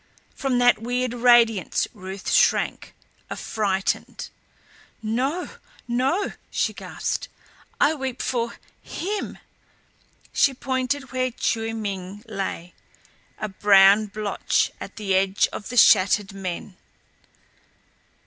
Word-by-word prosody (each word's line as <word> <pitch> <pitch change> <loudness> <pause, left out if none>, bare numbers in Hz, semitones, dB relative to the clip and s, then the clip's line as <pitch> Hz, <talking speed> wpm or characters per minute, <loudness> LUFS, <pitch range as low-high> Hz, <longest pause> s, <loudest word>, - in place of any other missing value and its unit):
From 270 -2 -1
that 245 -2 +4
weird 245 +1 -1
radiance 235 -5 +4
Ruth 190 -2 -6
shrank, - - +2 0.3
affrighted. 195 -3 -2 0.7
"No 260 +11 -1 0.4
no," 265 +11 0 0.2
she - - 0
gasped. - - -4 0.5
"I 295 - +4
weep 265 -4 -4
for 235 -2 -2 0.2
HIM." 410 +4 -4 1.0
She 275 - +3
pointed 260 +2 -2
where 255 0 0
Chiu 225 -2 -2
Ming 200 -1 -5
lay, 195 -4 -5 0.6
a 215 - -3
brown 200 +1 +5
blotch 210 0 0
at - - -8
the 200 -3 -2
edge 190 +1 +3
of 205 - -6
the 245 - -4
shattered 195 -1 +5
men. 185 -1 -6
225 Hz, 100 wpm, -24 LUFS, 195-255 Hz, 1.0 s, brown